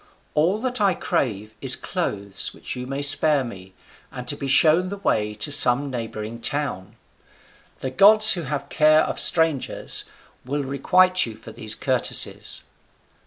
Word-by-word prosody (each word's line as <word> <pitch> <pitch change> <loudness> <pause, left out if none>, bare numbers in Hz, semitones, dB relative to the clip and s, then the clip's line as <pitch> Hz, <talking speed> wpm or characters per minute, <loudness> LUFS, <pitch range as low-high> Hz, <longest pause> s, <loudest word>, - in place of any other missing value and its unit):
All 170 +7 +1
that 250 -2 -3
I 195 -3 +2
crave 110 -8 -3
is - - +5
clothes, 100 -1 -4
which - - -7
you 125 0 -7
may 135 +2 -4
spare 145 0 +4
me, 95 -6 -11 0.4
and 125 -1 -9
to - - +1
be 140 - -6
shown 160 +6 +3
the 200 - -7
way 105 - -2
to 105 +7 -3
some 135 +1 +5
neighbouring 115 -1 -7
town. 135 -9 -3 0.9
The 130 - -4
gods, 215 +8 +6
who 175 - -4
have 140 -2 -5
care 155 +1 +3
of - - -3
strangers, 160 -5 0 0.4
will 140 +3 -4
requite 185 +6 +2
you 110 - -9
for 110 - -13
these 110 -2 0
courtesies." 130 0 -1
140 Hz, 155 wpm, -22 LUFS, 115-160 Hz, 0.9 s, gods